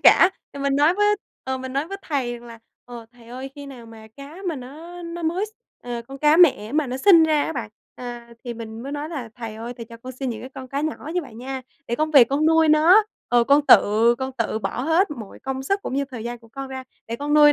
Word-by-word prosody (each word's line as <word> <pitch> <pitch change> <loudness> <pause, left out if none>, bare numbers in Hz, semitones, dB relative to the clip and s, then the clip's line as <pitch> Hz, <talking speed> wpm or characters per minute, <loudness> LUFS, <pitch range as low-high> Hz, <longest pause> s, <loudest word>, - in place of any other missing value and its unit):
cả. 375 - +7 0.2
Thì 280 - -8
mình 275 0 +1
nói 300 +4 +4
với 415 +1 +3 0.3
ờ, 265 0 -2
mình 260 0 -6
nói 280 +4 -1
với 395 - -4
Thầy 270 -6 -1
rằng 240 0 -13
là, 230 - -11 0.3
ờ, 235 -2 -10
"Thầy 240 -1 -18
ơi, 260 +3 -7
khi 285 -1 -9
nào 250 -4 -11
mà 220 -1 -13
cá 280 +4 -10
mà 320 - -2
nó 320 +8 -9
nó 335 0 -6
mới 345 +6 0
s", - - -13 0.3
ờ, 240 -1 -5
con 275 0 -8
cá 300 +2 +5
mẹ 265 -11 +5
mà 300 -1 +1
nó 250 - -3
sinh 335 +4 +7
ra 310 -2 +3
á - - -3
bạn. 230 -7 -5 0.2
À, 240 -1 -8
thì 240 -1 -4
mình 225 0 -8
mới 275 +2 -6
nói 295 +1 -4
là 280 -8 -5
"Thầy 225 -2 -6
ơi, 230 +2 -6
Thầy 230 - -7
cho 230 +1 -12
con 255 +3 -9
xin 255 0 -3
những 220 - -5
cái 255 - -7
con 260 -1 -8
cá 275 +2 -2
nhỏ 310 0 -4
như 360 - +1
vậy 270 - -12
nha, 260 +3 -6 0.2
để 235 - -1
con 310 +2 0
về 275 -6 +8
con 280 +5 +1
nuôi 320 0 +5
nó, 325 +7 +7 0.3
ờ, 240 -1 +4
con 285 +3 +4
tự 225 +3 +6
con 265 0 -3
tự 225 -1 0
bỏ 240 - -3
hết 325 +5 +2
mọi 225 -8 -8
công 265 0 -4
sức 395 +8 -1
cũng - - -4
như 280 +1 +1
thời 250 -5 -8
gian 240 0 -4
của 230 -1 -19
con 270 +3 -7
ra 260 0 -6 0.2
để 230 - -4
con 290 +3 -1
nuôi 295 -1 +8
270 Hz, 275 wpm, -23 LUFS, 240-305 Hz, 0.3 s, về